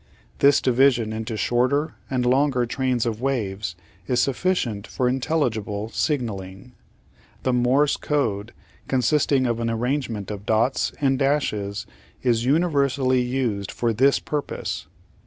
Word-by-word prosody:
This 140 -1 +5
division 125 -3 +3
into 110 0 -4
shorter 130 - +1 0.2
and 125 -2 0
longer 130 0 +2
trains 125 -1 0
of 115 -1 -2
waves 105 -9 -2 0.3
is 125 - +1
sufficient 125 - 0
for 125 - -1
intelligible 115 -6 -1
signalling. 110 -7 -3 0.7
The 130 - +1
Morse 130 +4 +3
Code, 115 -7 -1 0.4
consist 135 +4 +1
ing 135 -2 +3
of 120 -1 0
an 115 0 -1
arrangement 115 -3 -2
of 100 -1 -6
dots 115 +4 +2
and 135 -2 +2
dashes, 105 -8 0 0.4
is 120 -2 +2
universally 140 -4 +2
used 125 -6 -1
for 115 -1 0
this 135 +5 +4
purpose. 150 -1 -4
125 Hz, 125 wpm, -23 LUFS, 110-135 Hz, 0.7 s, This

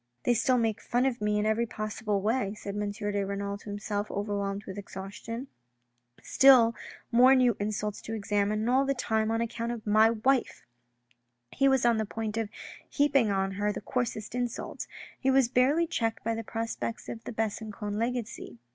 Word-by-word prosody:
" 120 - -48
They 245 - +3
still 250 +2 +2
make 225 -2 0
fun 245 +2 +1
of 245 -4 -1
me 210 0 +1
in 210 - +1
every 220 +2 +1
possible 215 -2 -3
way," 215 -2 0
said 200 -1 -6
M. 205 0 -1
de 205 -1 -2
Renal 200 +1 -3
to 205 - -11
himself, 205 0 -3
overwhelmed 200 0 -3
with 190 +1 -6
exhaustion. 205 +6 -7 0.4
" 120 0 -50 0.3
Still 250 -4 +6 0.4
more 250 +3 +7
new 250 -4 +4
insults 210 0 -2
to 225 - -5
examine 205 0 0
and 225 - 0
all 265 +2 +4
the 275 0 0
time 220 -3 0
on 225 0 0
accouut 235 0 -3
of 230 -2 -6
my 215 +1 +5
wife." 240 +3 0 0.9
He 275 - +2
was 265 -2 +3
on 235 -1 +4
the 220 - 0
point 220 0 -4
of 225 -2 -2 0.4
heaping 280 -6 +3
on 195 -1 0
her 205 +2 0
the 205 - -5
coarsest 225 -1 -3
insults 245 -1 -3 0.3
He 265 - +1
was 265 -2 +4
barely 270 +7 +3
checked 225 -8 -2
by 230 - 0
the 225 0 -4
prospects 225 +1 -4
of 225 - -7
the - - -5
Besancon 215 -1 -3
legacy. 230 - -3
220 Hz, 190 wpm, -29 LUFS, 205-240 Hz, 0.9 s, more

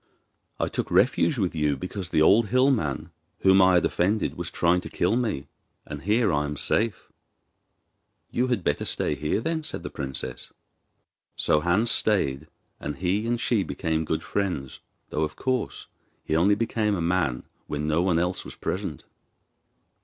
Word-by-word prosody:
'I - - 0
took - - -3
refuge 130 +5 +3
with 95 -5 0
you 75 -3 0
because 90 +4 -5
the 75 - +3
old 105 +6 +5
hill 130 +5 +4
man, 80 - -2 0.3
whom 95 0 +6
I 95 0 +5
have 90 - +4
offended, 100 +4 0
was - - -4
trying 90 +1 +2
to - - -8
kill 90 +6 +1
me, 115 - -1 0.4
and 75 -1 -7
here 105 +2 +2
I 75 0 +1
am 75 0 -4
safe.' 110 +7 0 1.2
'You 125 +2 +1
had 120 -7 0
better 75 - 0
stay - - 0
here 75 +7 -1
then,' 160 +6 -1
said - - -4
the - - -6
princess. 65 -2 -5 0.8
So 75 - +2
Hans 90 +9 +2
stayed, 75 -9 +1 0.3
and 75 0 -4
he 95 +6 -1
and 120 0 0
she 115 -3 +2
became 80 -4 -1
good - - -2
friends; 90 -10 -3 0.3
though, 75 - -1
of 75 - -1
course, 130 -2 -2 0.4
he 80 - -1
only 95 +5 +4
became 110 -1 0
a - - -3
man 85 -7 0 0.2
when 75 +1 -3
no 80 +2 +2
one 90 -2 +2
else 90 +2 -1
was - - -9
present. - - -4
90 Hz, 170 wpm, -26 LUFS, 75-110 Hz, 1.2 s, whom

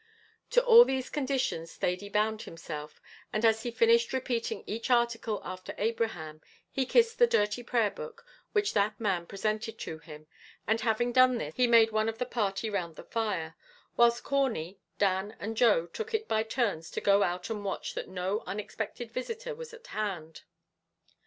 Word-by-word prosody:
To - - +3
all 475 -1 +10
these 265 - -2
conditions 265 - -1
Thady 185 +3 -2
bound 215 +1 +1
himself, 150 -2 -8 0.3
and 215 +2 0
as 220 0 +4
he 240 - -3
finished 235 +1 +3
repeating 250 -3 -2
each 230 +3 -4
article 235 -3 +1
after 185 0 -7
Abraham, 205 -9 -2 0.3
he 265 -2 -1
kissed 460 - +3
the 480 - +7
dirty 210 - +1
prayer 235 -3 +1
book 480 -1 -9 0.3
which 415 -2 +1
that 205 0 +1
man 190 -6 -1
presented 215 +2 -2
to 160 - -6
him; 155 -2 -12 0.4
and 220 +1 +1
having 240 +1 +1
done 255 0 +5
this, 155 -8 -4
he 250 +6 +3
made 230 -1 +6
one 215 +1 +1
of 225 - -5
the 250 - -1
party 210 -3 -1
round 180 -6 -3
the - - -10
fire, 195 -8 -2 0.4
whilst 235 0 +4
Corney, 225 - -1 0.2
Dan, 200 +2 0
and 220 +2 -4
Joe 215 -8 +4
took 445 - -4
it 440 0 -2
by 220 - +2
turns 220 -8 -1
to - - -3
go 200 0 +4
out 180 +3 -1
and 210 -2 -4
watch 195 - -3
that - - -5
no 190 +3 -2
unexpected 220 +3 -5
visitor 460 - -4
was 475 0 -9
at 470 +1 -13
hand. 185 - -4
220 Hz, 175 wpm, -30 LUFS, 195-245 Hz, 0.4 s, all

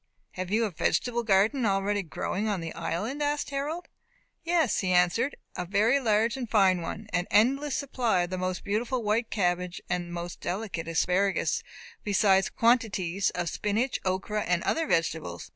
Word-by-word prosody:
have 185 -1 -5
you 225 +3 +2
a 210 - -3
vegetable 240 +8 0
garden 220 +5 +2
already 200 0 +1
growing 195 +4 -3
on 200 -3 -1
the 165 -1 -5
island?" 210 - -3
asked 290 0 -1
Harold. 295 +5 -3 0.6
"Yes," 330 -6 +2
he 185 -2 0
answered, 180 +10 +2 0.2
"a 180 - -2
very 210 +9 +2
large 225 -1 +2
and 250 -4 -5
fine 190 -4 +4
one; 200 +6 -5
an 175 +1 0
endless 270 +6 +3
supply 245 -9 0
of 175 - -5
the 185 - -2
most 185 0 -2
beautiful 235 +4 -1
white 215 +2 0
cabbage, 180 -2 -1
and 175 -1 -2
most 175 0 -6
delicate 185 -3 -3
asparagus, 180 +4 +1 0.4
besides 195 -1 +3
quantities 200 -6 +1
of 175 -1 -2
spinach, 215 +9 -1
okra, 195 +3 -1
and 180 -3 0
other 325 -1 0
vegetables. 160 - -1
205 Hz, 160 wpm, -28 LUFS, 180-235 Hz, 0.6 s, fine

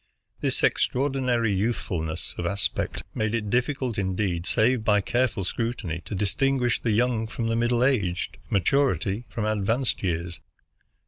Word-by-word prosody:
This - - -1
extraordinary 125 -5 +2
youthful 95 -4 -1
ness 80 -1 -4
of 85 - -1
aspect 100 +1 -1
made 110 +1 0
it 105 -3 -2
difficult, 125 -2 0
indeed, 95 -2 -1
save 115 +1 +2
by 105 -1 +4
careful 120 0 0
scrutiny, 105 -4 -3
to 105 - -4
distinguish 125 +5 +1
the 115 - -1
young 115 0 +2
from 115 +1 -3
the 115 - +1
middle 120 +1 +2
aged, 100 -10 0
maturity 115 0 +1
from 105 +1 -3
advanced 110 +4 0
years. 85 -2 -2
110 Hz, 140 wpm, -26 LUFS, 95-125 Hz, -, by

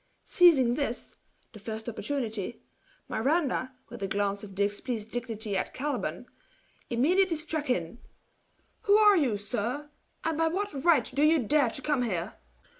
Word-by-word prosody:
Seizing 285 -9 +5
this, 250 -3 -3 0.4
the 215 - -11
first 220 +2 -6
opportunity, 235 -4 -3 0.4
Miranda, 265 0 0 0.2
with - - -9
a 195 - -1
glance 200 +1 -1
of 195 -2 -10
displeased 210 +3 -2
dignity 225 -4 -4
at 185 - -2
Caliban, 290 +2 -3 0.6
immediately 335 +9 +3
struck 310 -1 -1
in: 180 0 -1 0.9
"Who 405 +1 +6
are 420 -1 +7
you, 265 - +2
sir, 245 +8 -3 0.3
and 325 -1 -1
by 325 - +3
what 375 -4 -3
right 315 -9 +4
do 280 - 0
you 310 +2 +5
dare 285 0 +2
to 275 - -4
come 295 -4 +1
here?" 190 -5 -2
255 Hz, 145 wpm, -28 LUFS, 215-305 Hz, 0.9 s, are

